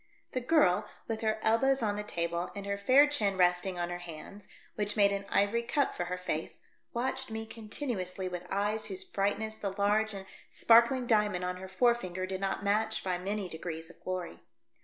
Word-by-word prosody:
The 255 - -2
girl, 215 - +3 0.2
with 225 -1 -3
her 220 -1 +1
elbows 265 +4 +3
on 205 -2 +1
the 210 - -2
table 170 -3 -2
and 200 0 -6
her 200 0 -1
fair 255 +8 +6
chin 210 -10 +1
resting 180 +1 +2
on 175 0 -2
her 175 - -4
hands, 175 +4 -10 0.3
which 205 +1 -1
made 200 -1 +5
an 200 0 -2
ivory 205 +4 +2
cup 270 +4 0
for 175 - -3
her 180 +1 -3
face, 165 -3 -4 0.3
watched 260 +2 -2
me 220 0 -4
continuously 210 -5 -4
with 180 0 -6
eyes 210 +2 0
whose 190 -2 -4
brightness 210 +3 -1
the 200 -3 -3
large 210 +1 +2
and 190 -1 -7 0.2
sparkling 235 +2 +5
diamond 210 -5 +2
on 180 0 -3
her 190 +1 -8
fore 235 +6 +4
finger 185 -5 -4
did 190 0 -4
not 195 0 -1
match 215 +2 +1
by 180 -2 -1
many 200 +1 -2
degrees 165 0 -6
of - - -23
glory. 185 -2 -4
200 Hz, 195 wpm, -31 LUFS, 185-220 Hz, 0.3 s, fair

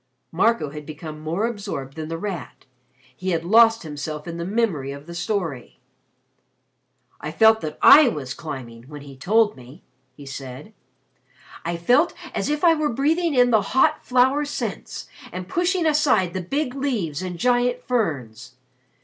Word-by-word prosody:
Marco 180 -4 +1
had 150 0 -8
become 155 0 -8
more 165 +7 -2
absorbed 195 - -5
than 160 -1 -5
The 165 - -3
Rat. 185 -3 -6 0.5
He 185 +5 -4
had 165 -2 0
lost 225 +3 +5
himself 150 0 -6
in 170 0 -5
the 170 - -4
memory 190 - -1
of 140 +1 -9
the 170 - -9
story. 175 - -3 1.4
"I - - -5
felt 220 +6 +5
that 155 -1 -5
I 295 -1 +9
was 140 - -3
climbing, 125 -7 -8
when 145 0 -9
he 140 -1 -11
told 210 +10 +2
me," 130 +6 -14 0.3
he 145 - -12
said. 135 +7 -8 0.9
"I 170 0 -2
felt 250 - +3 0.2
as - - -2
if 300 +2 -1
I 335 -2 +7
were 305 -2 0
breathing 305 +6 +1
in 245 -1 +4
the 220 -2 +4
hot 265 +9 +2
flower 260 +3 +3
scents 290 - -5 0.2
and 180 0 -6
pushing 350 - 0
aside 285 - +2
the 185 - -3
big 265 - -2
leaves 230 - -2
and 180 -2 -5
giant 245 +4 +1
ferns. 140 - -3
185 Hz, 160 wpm, -23 LUFS, 150-245 Hz, 1.4 s, I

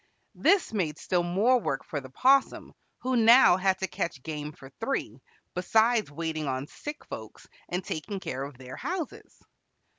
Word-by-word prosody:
This 390 - +3
made 165 -8 -1
still 180 -1 0
more 200 +9 +3
work 135 - -3
for 145 - -4
the 130 - -11
'Possum, 265 - +2 0.3
who 255 0 0
now 230 -3 +7
had 190 0 +2
to 190 - 0
catch 150 -4 -4
game 150 -2 -5
for 135 -2 -14
three, 225 - -3 0.3
besides 220 +4 +2
waiting 155 0 -3
on 130 0 -2
sick 295 - -8
folks - - -9 0.2
and 180 +1 -2
taking 195 +6 -4
care 130 -7 -4
of 140 -1 -6
their 130 0 -9
houses. 350 -4 -5
180 Hz, 160 wpm, -28 LUFS, 145-230 Hz, 0.3 s, now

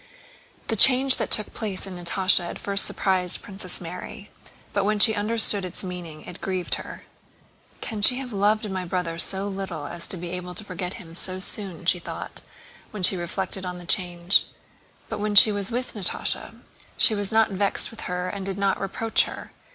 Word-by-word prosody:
The 225 - +1
change 260 +4 +7
that - - -2
took 215 - +1
place 205 -4 -4
in 190 -2 -8
Natásha 180 +1 +2
at - - -7
first 200 0 +2
surprised 185 -2 -1
Princess 190 -2 -1
Mary; 185 +5 -9 0.4
but 200 - +1
when 210 +1 +1
she 220 +2 +5
understood 210 -1 +4
its 185 +1 -2
meaning 175 -4 -8
it 180 - -10
grieved 185 -2 -3
her. - - -10 0.8
"Can 215 -3 -4
she 250 +5 +7
have 255 -3 -7
loved 210 +2 +1
my 185 -1 -3
brother 175 -2 -3
so 195 +3 -1
little 190 -6 -5
as 170 +3 -4
to 190 - -4
be 175 0 -6
able 180 0 -6
to 215 - -4
forget 180 -1 -6
him 170 -7 -12
so 185 +2 +2
soon?" 185 -3 -4
she 180 0 +2
thought - - -8 0.5
when 205 -3 -7
she 190 - +6
reflected 185 +2 -4
on 180 -1 -5
the 175 - -11
change. 175 +1 +1 0.6
But - - -5
when 210 0 -2
she 210 +2 +9
was 205 0 -2
with 245 +2 -3
Natásha 200 -5 -2 0.4
she 225 - +8
was 205 -2 -1
not 220 -1 +3
vexed 200 +4 +1
with 225 - -9
her 180 0 -3
and 195 +1 -5
did 195 0 -4
not 200 -1 0
reproach 220 +3 0
her. - - -9
190 Hz, 190 wpm, -24 LUFS, 180-210 Hz, 0.8 s, she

